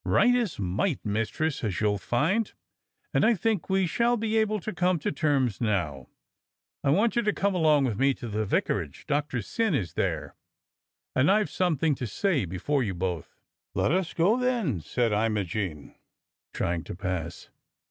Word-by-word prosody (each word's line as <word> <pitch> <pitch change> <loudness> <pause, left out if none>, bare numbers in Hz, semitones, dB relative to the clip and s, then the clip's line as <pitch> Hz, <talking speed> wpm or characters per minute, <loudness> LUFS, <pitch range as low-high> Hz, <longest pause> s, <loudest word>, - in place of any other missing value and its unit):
"Right 245 - +4
is 240 -8 0
might, 105 - -1
Mistress, 115 +9 -1
as 105 -6 -1
you'll 105 -2 +1
find, 165 - +1 0.6
and - - +3
I 230 +1 +5
think 210 0 -1
we 190 0 +3
shall 235 +7 +2
be 220 0 -1
able 215 -1 +2
to 215 - -4
come 180 0 +2
to 150 - -2
terms 135 -7 +1
now. 85 - -1 0.8
I - - +2
want 205 +10 +3
you 235 - +3
to 210 -2 +1
come 200 0 0
along 155 -5 +4
with 110 -5 -2
me 135 0 +3
to 120 - -7
the 110 0 -1
vicarage; 90 -6 -1
Doctor 145 -5 -1
Syn 220 - 0
is 95 -10 -2
there, - - -2 0.8
and 130 +6 +4
I've 205 -4 +3
something 165 -4 +1
to 130 -2 -4
say 150 - 0
before 95 - -1
you 100 -6 -2
both." 90 -2 -3 0.4
"Let - - +2
us 185 0 0
go, 190 +8 +3
then," 235 - 0
said 120 +8 0
Imogene, 105 -7 -1 0.6
trying 85 -1 -1
to - - -6
pass. 90 -3 -4
140 Hz, 170 wpm, -27 LUFS, -, 0.8 s, I